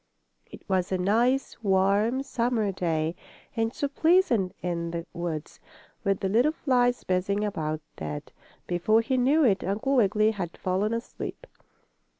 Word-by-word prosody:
It - - -14
was 185 -1 0
a 190 - +1
nice, 235 +9 +1
warm, 200 +5 +2
summer 235 -5 0
day, 165 -3 -1 0.4
and 225 -1 0
so 285 - -2
pleasant 280 - +2
in 170 -1 -2
the 170 0 -4
woods, 170 -3 -5 0.4
with 195 -2 0
the 195 - 0
little 240 +10 +3
flies 245 -5 +1
buzzing 190 +3 0
about, 155 -6 -3 0.2
that, 75 -1 -6 0.3
before 195 +6 +2
he 260 +3 -1
knew 275 +5 +3
it 205 -7 +3
Uncle 220 +8 0
Wiggily 215 -1 +3
had 180 -6 -5
fallen 190 +4 0
asleep. 230 - -5
205 Hz, 145 wpm, -27 LUFS, 180-245 Hz, 0.4 s, little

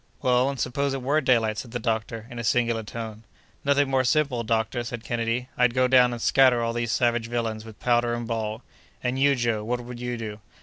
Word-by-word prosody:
"Well, 125 +1 +3
and 140 -2 -5
suppose 135 +2 -1
it 135 - -5
were 145 +4 +2
daylight?" 115 -5 +2
said 120 - -7
the - - 0
doctor, 110 -1 -2
in 120 - -6
a - - -3
singular 115 0 +1
tone. 110 0 -7 0.4
"Nothing 140 0 +3
more 135 -1 +2
simple, 140 -2 +1
doctor," 115 +2 0
said 120 -1 -6
Kennedy. 120 +1 -2
"I'd 125 -1 +2
go 130 0 +4
down 125 -1 +5
and 120 - -5
scatter 125 0 +4
all 115 0 -1
these 120 -1 -1
savage 120 -1 +1
villains 115 -2 -3
with 110 -2 -12
powder 120 -1 +2
and 120 0 -4
ball!" 110 0 -3 0.4
"And 125 +1 -1
you, 140 0 +4
Joe, 120 -4 0
what 120 +3 -2
would 120 0 -9
you 125 0 -3
do?" 110 -2 -6
120 Hz, 220 wpm, -25 LUFS, 115-125 Hz, 0.4 s, down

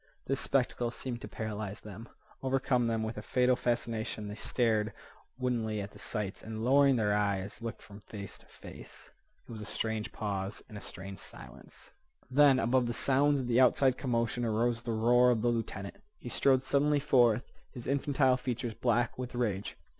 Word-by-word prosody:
This 135 0 0
spectacle 125 -2 +1
seemed 120 0 -5
to - - -6
paralyze 105 -2 -5
them, 105 +2 -10 0.3
overcome 130 -2 +1
them 115 -1 0
with 110 +2 -4
a - - -6
fatal 125 0 +2
fascination. 115 -3 -2
They - - -5
stared 110 -1 0 0.4
woodenly 115 -4 -1
at 100 0 -5
the - - -14
sights, 105 -4 -3
and, 110 0 -5
lowering 140 +1 +5
their 105 -3 +2
eyes, 100 0 -1
looked 115 -1 -6
from 100 0 -12
face 100 -2 -9
to - - -17
face. - - -12 0.4
It - - -11
was 110 -2 -7
a - - -5
strange 110 +1 -2
pause, 100 -1 -3
and 105 - -12
a 100 - -7
strange 95 +1 -6
silence. - - -12 0.4
Then, 140 0 +6
above 125 0 +2
the 120 - -2
sounds 140 +1 +3
of 125 - -4
the 120 0 +3
outside 130 0 +4
commotion, 120 -2 -1
arose 115 +1 +1
the 115 - -4
roar 120 +3 +4
of 115 -2 +1
the 120 - +3
lieutenant. 110 -4 -3 0.2
He 120 - -8
strode 130 +1 +3
suddenly 145 +2 +2
forth, 125 -5 +4 0.3
his 125 -3 -9
infantile 135 -1 +2
features 125 -2 -3
black 120 +1 0
with 125 -1 -5
rage. 105 -5 -2
120 Hz, 180 wpm, -31 LUFS, 110-125 Hz, 0.4 s, Then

